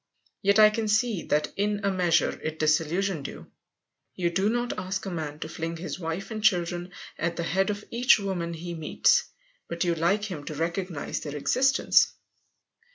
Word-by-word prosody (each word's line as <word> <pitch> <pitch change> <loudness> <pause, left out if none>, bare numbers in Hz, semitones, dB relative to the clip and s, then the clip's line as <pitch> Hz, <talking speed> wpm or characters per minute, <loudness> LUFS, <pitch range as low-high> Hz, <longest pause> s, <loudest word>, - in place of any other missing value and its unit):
Yet 200 +1 +3
I 215 0 +8
can 220 0 -2
see 215 -2 +1
that 150 0 0
in 205 +1 0
a 200 - +2
measure 180 -3 +2
it 155 0 -4
disillusioned 160 +2 +1
you. - - -11 0.6
You 175 -1 0
do 190 +4 +1
not 240 +1 -1
ask 190 +1 -3
a 195 - -4
man 155 -3 -4
to - - -3
fling 165 +1 -4
his 180 +2 -5
wife 170 +5 -4
and 215 -1 -4
children 175 -3 +1 0.3
at 170 0 -1
the 170 - -2
head 190 +4 +1
of 205 0 -4
each 245 +3 +5
woman 180 -5 -3
he 170 +2 -6
meets, 170 - +2 0.4
but 170 0 -2
you 175 -1 +2
like 170 +6 +1
him 180 -9 -5
to 155 - -5
recognize 170 0 -3
their 145 -1 -6
existence. 265 - +3
180 Hz, 180 wpm, -27 LUFS, 165-205 Hz, 0.6 s, I